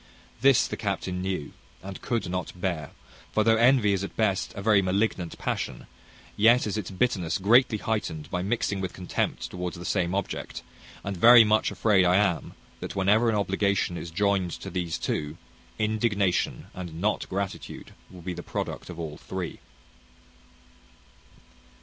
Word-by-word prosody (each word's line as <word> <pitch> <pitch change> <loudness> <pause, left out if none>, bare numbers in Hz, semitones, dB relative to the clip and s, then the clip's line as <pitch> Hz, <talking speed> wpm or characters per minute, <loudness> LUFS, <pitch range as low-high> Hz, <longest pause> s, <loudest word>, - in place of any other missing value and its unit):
This 135 -2 +5
the - - -5
captain 95 -3 -2
knew, 95 -6 -3 0.3
and 95 0 -8
could 120 -2 -1
not 90 0 -4
bear; 85 -6 -2 0.4
for 110 - +3
though 115 0 +4
envy 120 -3 +4
is 100 0 -1
at 100 - -6
best 100 -4 +1
a 100 - -5
very 105 -2 +5
malignant 95 -2 -1
passion, 60 - -3 0.5
yet 115 +4 +5
is 105 - -2
its 105 -4 -3
bitterness 95 -6 0
greatly 115 +4 +4
heightened 100 -9 -3
by 90 - -1
mixing 100 -1 -1
with 95 -2 -4
contempt 90 -1 -3
towards 90 -1 -4
the 85 - -8
same 90 0 0
object; 100 - -4 0.4
and 100 -1 -4
very 120 +5 +9
much 110 0 +2
afraid 105 -4 +3
I 90 0 +4
am, 100 -4 +1 0.2
that - - -6
whenever 105 +5 +3
an 110 - +1
obligation 100 -2 0
is 85 - -6
joined 100 +1 +1
to 95 - -7
these 85 -3 -2
two, 75 +1 -3 0.4
indignation 105 -3 0
and 85 -3 -7
not 105 +4 -1
gratitude 100 0 -5 0.2
will 90 -2 -12
be 90 +1 -3
the 85 - -6
product - - -5
of 85 - -8
all 80 -2 -5
three. 95 -3 -6
95 Hz, 160 wpm, -27 LUFS, 90-105 Hz, 0.5 s, very